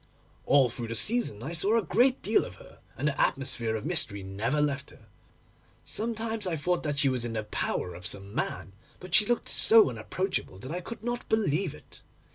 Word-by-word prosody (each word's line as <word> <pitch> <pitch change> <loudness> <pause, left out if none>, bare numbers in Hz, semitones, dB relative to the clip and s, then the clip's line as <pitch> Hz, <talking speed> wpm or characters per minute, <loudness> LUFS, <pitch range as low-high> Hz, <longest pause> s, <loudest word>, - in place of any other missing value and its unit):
'All 140 -2 +5
through 120 0 -5
the 115 - -4
season 120 - +4
I 145 - -4
saw 200 +7 +2
a 225 - +1
great 250 - +2
deal - - +3
of - - -9
her, - - -16 0.2
and 145 - -1
the 145 - 0
atmosphere 130 -4 0
of 110 - -5
mystery 100 -1 -2
never 110 +9 -1
left 140 -1 -1
her. 110 - -18 0.8
Sometimes 225 -2 -2
I 170 - -1
thought 175 +4 0
that 145 -2 -2
she 145 -1 +3
was 130 -3 0
in 120 -1 -4
the 110 -1 -2
power 90 -3 -2
of 90 +2 -5
some 100 +1 -5
man, 95 - -3 0.3
but 185 -1 -10
she 210 +1 +6
looked 240 - 0
so 220 - +5
unapproachable, 125 - -3
that 130 +9 -8
I 180 +2 -3
could 220 +3 -9
not 240 0 -4
believe 190 -6 +1
it. - - -15
145 Hz, 205 wpm, -28 LUFS, -, 0.8 s, she